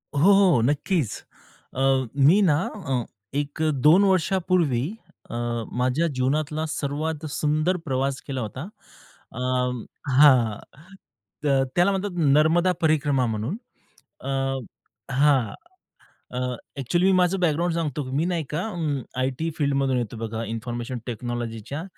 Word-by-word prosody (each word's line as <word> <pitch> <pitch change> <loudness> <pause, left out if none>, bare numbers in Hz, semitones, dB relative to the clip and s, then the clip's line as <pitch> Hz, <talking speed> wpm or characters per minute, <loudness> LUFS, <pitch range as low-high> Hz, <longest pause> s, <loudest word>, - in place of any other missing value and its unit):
हो, - - +1
हो 190 - +5
नक्कीच, 145 - +1 0.7
अ, 130 - -2 0.5
मी 190 +7 +6
ना 160 -7 +4 0.3
अ, 125 -4 -1 0.3
एक 145 +1 -3
अ, 160 - +3 0.2
2 180 +6 +7
वर्षापूर्वी 180 -8 +2 0.4
अ, - - -6 0.4
माझ्या 130 +7 +1
जीवनातला 150 +3 -1
सर्वात 155 +2 -3
सुंदर 155 +5 +1
प्रवास 135 -1 -1
केला 135 -2 -3
होता. 115 +4 -5 0.7
अ, 120 - -8 0.8
हां 125 -8 +6 0.9
त - - +2 0.3
त्याला 175 +3 +4
म्हणतात 195 -1 -2 0.2
नर्मदा 170 +4 +4
परिक्रमा 145 -5 +2
म्हणून. 110 - -3 0.6
अ, 135 - -5 0.8
हां, 135 -4 +3 0.8
अ, 125 0 -1 0.3
एक्चुअली 175 +9 +2
माझं 180 +2 +1
बॅकग्राऊंड 170 0 +1
सांगतो 150 -4 -2
मी 145 +5 0
नाही 175 -2 -1
का, 150 +3 -2
अं, 155 -8 -2 0.2
आयटी 135 +5 -1
फील्डमधून 140 -3 +1
येतो 115 -1 -3
बघा 115 0 -4
इन्फॉर्मेशन 120 +3 -4
टेक्नॉलॉजीच्या. 120 +3 -4
145 Hz, 120 wpm, -24 LUFS, 125-165 Hz, 0.9 s, 2